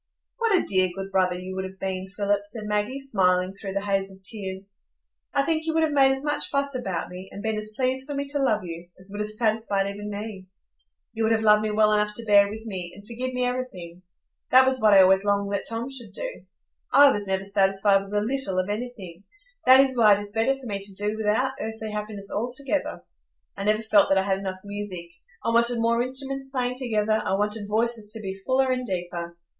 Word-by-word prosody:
"What 455 -4 +3
a - - 0
dear, 185 -2 +3
good 195 0 -6
brother 185 -2 +2
you 185 +1 -7
would 190 - -2
have 190 0 -8
been, 190 0 -3
Philip," 200 +1 0
said 215 +1 -8
Maggie, 210 +6 -1
smiling 185 -8 +2
through 195 -1 -7
the 200 - -1
haze 195 -1 0
of 190 - -13
tears. 195 -1 -5 0.5
"I 280 - +2
think 320 +1 0
you 320 - 0
would 320 - +3
have 315 - +1
made 270 -2 +5
as 270 +1 -1
much 295 0 -1
fuss 280 0 0
about 195 -10 -3
me, 185 +1 -9
and 200 - -8
been 220 0 -1
as 215 0 -4
pleased 260 +2 -1
for 290 - -4
me 280 0 -2
to 285 0 +1
love 220 -7 +1
you, 170 0 -8
as 185 +1 -12
would 205 - -6
have 210 - -3
satisfied 215 -2 +1
even 205 +1 -6
me. 205 -2 -6 0.7
You 225 - -4
would 220 0 +2
have 220 0 +2
loved 210 -1 +6
me 215 - -1
well 215 0 +3
enough 210 0 +1
to 230 - -3
bear 200 -1 +5
with 220 +2 -8
me, 185 -5 -5
and 205 - -14
forgive 245 +3 -4
me 250 0 +1
everything. 185 -9 -5 0.5
That 260 +1 +7
was 260 -1 +1
what 210 -2 +6
I 190 - +9
always 190 +1 +4
longed 200 0 0
that 200 - -2
Tom 230 +2 -3
should 235 -7 -7
do. - - -6 0.5
I 285 0 +8
was 205 -4 -3
never 190 0 -1
satisfied 195 0 +2
with 195 +1 -11
a 205 - +2
little 240 -4 +1
of 185 +1 0
anything. 205 -6 -6 0.4
That 260 +1 +9
is 270 -1 +4
why 215 -4 +6
it - - -4
is 205 0 -8
better 225 +5 +1
for 270 -1 -13
me 200 -4 -3
to 195 0 -5
do 210 +1 -1
without 220 +5 +1
earthly 220 -1 -5
happiness 210 -1 -4
altogether. 255 +6 -2 0.5
I 195 - -5
never 215 +1 +2
felt 210 -2 +4
that 195 - +4
I 190 - +3
had 195 -1 0
enough 190 -1 -5
music,—I 185 -4 -7
wanted 235 +1 +3
more 230 +1 +2
instruments 270 +2 -3
playing 250 -1 -2
together; 220 -3 +1
I 190 - 0
wanted 210 +1 -2
voices 220 0 0
to 225 - -3
be 195 -3 -4
fuller 260 0 +2
and 255 0 -1
deeper. 175 -4 -4
210 Hz, 230 wpm, -25 LUFS, 195-245 Hz, 0.7 s, I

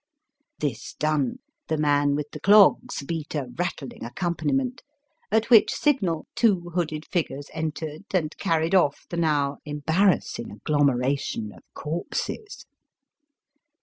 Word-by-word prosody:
This 130 -5 -4
done 155 - 0 0.3
the 160 - 0
man 145 -1 +2
with 150 0 -4
the - - -8
clogs 200 -7 +5
beat 160 +1 -4
a 145 - 0
rattUng 135 0 -5
accompaniment, 175 - -1 0.5
at 220 +2 +1
which 225 -3 +7
signal 195 - +1
two 185 -7 +2
hooded 155 -3 -2
figures 145 -5 -3
entered 155 +1 -4
and 165 -5 0
carried 165 -2 +1
off 160 -7 +3
the 170 - -3
now 145 -4 +1
embarrassing 160 -1 +1
agglomeration 135 -1 0
of - - -16
corpses. 175 - -4
155 Hz, 115 wpm, -25 LUFS, 145-180 Hz, 0.5 s, which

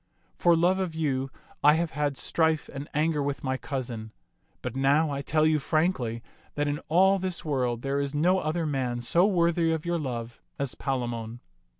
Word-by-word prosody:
For 175 -1 +4
love 180 +3 +3
of 180 -4 -2
you 135 -4 -1 0.3
I 150 +1 +7
have 165 0 -1
had 145 -1 -1
strife 160 -2 0
and 140 +1 -6
anger 150 0 +1
with 140 -3 -3
my 130 -1 0
cousin; 120 -5 -5 0.5
but 125 -1 -4
now 140 +3 +3
I 140 0 -2
tell 155 +2 +2
you 155 -1 +3
frankly 135 -8 0 0.3
that 145 0 0
in 145 +1 -1
all 190 +4 +5
this 185 -2 -4
world 125 -5 -1
there 140 +1 0
is 140 +1 -2
no 180 +5 +3
other 160 +1 -1
man 130 -5 -1
so 170 +10 +3
worthy 170 -3 +2
of 160 0 -2
your 170 0 0
love 120 -5 -5 0.2
as 140 -2 -1
Palamon." 120 -4 -3
145 Hz, 185 wpm, -27 LUFS, 130-165 Hz, 0.5 s, I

